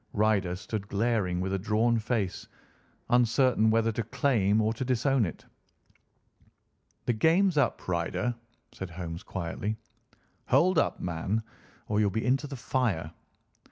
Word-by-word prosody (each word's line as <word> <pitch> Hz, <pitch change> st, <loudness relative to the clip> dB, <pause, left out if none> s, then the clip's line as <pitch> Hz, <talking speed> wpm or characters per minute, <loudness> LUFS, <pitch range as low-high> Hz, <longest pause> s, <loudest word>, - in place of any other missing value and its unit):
Ryder 100 Hz, -4 st, +2 dB
stood 105 Hz, +1 st, -5 dB
glaring 100 Hz, -4 st, 0 dB
with 95 Hz, +1 st, -2 dB
a 95 Hz, -, 0 dB
drawn 110 Hz, +3 st, +2 dB
face, 110 Hz, -4 st, -2 dB, 0.6 s
uncertain 120 Hz, -1 st, +4 dB
whether 115 Hz, +1 st, +2 dB
to 115 Hz, -, -2 dB
claim 110 Hz, -3 st, +1 dB
or 110 Hz, +1 st, +1 dB
to 115 Hz, -, -4 dB
disown 130 Hz, -1 st, +2 dB
it. 80 Hz, -, -9 dB, 1.6 s
"The 120 Hz, -, +2 dB
game's 165 Hz, -, +3 dB
up, 145 Hz, -, +1 dB
Ryder," 90 Hz, +7 st, -1 dB, 0.4 s
said 95 Hz, -, -7 dB
Holmes 85 Hz, -1 st, -6 dB
quietly. 95 Hz, +4 st, -4 dB, 0.7 s
"Hold 185 Hz, -1 st, +4 dB
up, -, -, 0 dB
man, 90 Hz, +6 st, -2 dB, 0.4 s
or 105 Hz, 0 st, +1 dB
you'll 105 Hz, -1 st, +3 dB
be 110 Hz, +4 st, -2 dB
into 135 Hz, +3 st, +1 dB
the 140 Hz, -, -6 dB
fire! 115 Hz, -11 st, -1 dB
110 Hz, 135 wpm, -28 LUFS, 95-120 Hz, 1.6 s, uncertain